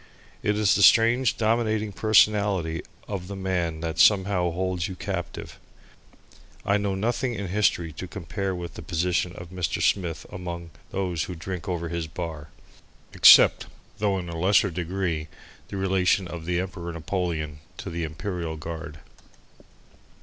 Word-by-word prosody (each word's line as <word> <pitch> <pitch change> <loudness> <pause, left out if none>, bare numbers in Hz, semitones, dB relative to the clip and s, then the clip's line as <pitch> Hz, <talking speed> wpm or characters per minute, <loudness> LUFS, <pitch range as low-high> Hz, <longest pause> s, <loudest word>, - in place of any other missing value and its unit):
It 105 0 0
is 105 -2 +4
the - - +1
strange 115 +5 +5
dominating 110 -1 +1
personality 100 -4 +3 0.3
of 95 -3 -5
the 100 - -6
man 90 -4 -2
that 80 -1 -3
somehow 95 -3 +4
holds 90 0 -2
you 95 - -6
captive. - - -5 1.1
I 100 -1 +3
know 100 -1 -1
nothing 120 +4 -1
in 100 -3 -4
history 85 -5 +1
to 95 +4 -7
compare 95 +1 -4
with 85 -1 -6
the - - -8
position 90 +2 0
of 85 0 -10
Mr. 90 -2 -2
Smith 85 -7 0
among 85 -2 -6 0.2
those 90 -5 -2
who 90 - -6
drink 95 +3 -6
over 85 -2 -2
his 85 -1 -3
bar, 80 -2 -6 0.6
except, - - +7 0.3
though 100 -2 +1
in 90 -2 -5
a 85 - -6
lesser 100 +2 +3
degree, 85 -2 -2 0.4
the 100 - -6
relation 95 0 +2
of 85 -2 -7
the 90 0 0
Emperor 90 -2 -5
Napoleon 80 -2 -3 0.2
to - - -6
the 85 0 -3
Imperial 80 0 -4
Guard. 80 -1 -7
90 Hz, 150 wpm, -25 LUFS, 85-100 Hz, 1.1 s, except